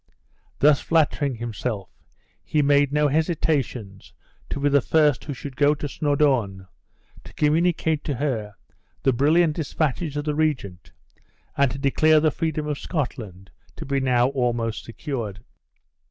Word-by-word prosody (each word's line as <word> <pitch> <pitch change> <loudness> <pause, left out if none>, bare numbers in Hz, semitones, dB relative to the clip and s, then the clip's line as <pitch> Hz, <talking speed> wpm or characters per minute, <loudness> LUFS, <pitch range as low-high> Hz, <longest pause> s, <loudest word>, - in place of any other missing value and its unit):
Thus 145 0 +4
flattering 145 -4 +1
himself, 110 -3 -4 0.6
he 150 -1 +1
made 140 0 +3
no 150 0 +2
hesitations 140 - -1 0.4
to - - -3
be 145 - +1
the 140 -1 +4
first 150 0 +2
who 145 - -4
should 135 +1 -8
go 145 +2 +3
to 145 - -5
Snawdoun, 135 -10 0 0.6
to - - -13
communicate 160 0 +1
to 145 - -2
her 115 -6 -3 0.5
the 135 - +3
brilliant 155 +5 +3
dispatches 155 0 -2
of 145 - -2
the 150 - 0
regent, 130 - -2 0.6
and 140 -1 +3
to 135 - -6
declare 155 +3 +3
the 155 0 +2
freedom 155 -2 -2
of 150 -2 -3
Scotland 105 - -5 0.2
to - - -7
be 140 0 0
now 125 -1 +2
almost 120 -4 -2
secured. 115 -5 -5
140 Hz, 140 wpm, -23 LUFS, 120-150 Hz, 0.6 s, Thus